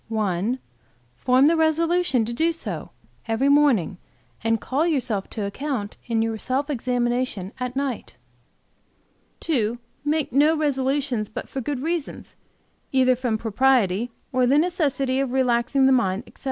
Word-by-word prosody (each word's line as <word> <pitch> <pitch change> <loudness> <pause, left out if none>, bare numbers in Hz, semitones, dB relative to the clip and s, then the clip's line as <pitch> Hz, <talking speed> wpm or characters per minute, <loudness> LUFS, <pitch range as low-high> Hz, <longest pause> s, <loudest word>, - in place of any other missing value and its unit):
"1. 215 +1 -1 0.6
Form 255 - +3
the 325 +3 +5
resolution 320 -4 +2
to 235 - -3
do 325 +7 +2
so, 330 - -6 0.4
every 230 +5 +1
morning, 265 - +3 0.4
and 225 0 +1
call 290 +9 0
yourself 240 - -1
to 210 - -4
account 215 0 -4
in 225 -2 +1
your 225 -1 -2
self 275 +5 -1
examination 245 -5 -1
at 250 0 -3
night. 270 - -3 1.3
"2. 240 -7 0 0.3
Make 300 -2 -1
no 300 +4 +4
resolutions 270 -5 0
but - - -6
for 270 - -5
good 270 +1 -3
reasons, 330 -2 -4 0.6
either 255 -1 +4
from 240 -3 -1
propriety 225 -2 +2 0.2
or 255 -1 +3
the 275 +3 +4
necessity 285 -6 +1
of 270 -2 -1
relaxing 260 +1 +2
the 265 - +5
mind, 215 -5 +1
etc. - - -17
255 Hz, 140 wpm, -23 LUFS, 225-285 Hz, 1.3 s, the